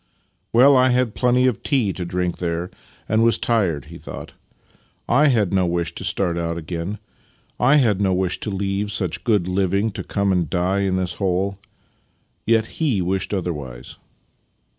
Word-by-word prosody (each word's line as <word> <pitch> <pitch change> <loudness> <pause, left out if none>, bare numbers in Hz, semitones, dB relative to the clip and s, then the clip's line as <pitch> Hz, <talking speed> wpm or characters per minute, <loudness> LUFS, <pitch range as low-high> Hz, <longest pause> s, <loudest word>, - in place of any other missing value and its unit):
" - - -46
Well, 135 +4 +6
I 130 0 +5
had 125 -3 +1
plenty 125 0 +2
of 125 -4 0
tea 120 -9 +1
to 90 - -5
drink 90 0 -2
there 85 0 -2 0.4
and 110 +1 +2
was 115 0 +4
tired," 95 - 0
he - - -11
thought - - -9 0.3
" - - -35
/ - - -40
had 120 -11 +3
no 95 -2 +2
wish 85 -1 -1
to - - -7
start 85 -3 0
out 85 0 -2
again. 85 +5 -4 0.4
/ - - -37
had 125 -6 +4
no 95 -1 +2
wish 90 -1 0
to - - -4
leave 100 +1 -2
such 95 -5 -2
good 105 -7 +1
living 100 +3 0
to - - -6
come 100 -1 0
and 90 -4 0
die 90 +2 0
in 95 -2 0
this 95 0 -1
hole. 95 +1 0 0.9
Yet 115 -1 +3 0.2
he 135 -11 +2
wished 95 +1 -2
otherwise." 75 -11 -5
95 Hz, 180 wpm, -21 LUFS, 90-110 Hz, 0.9 s, Well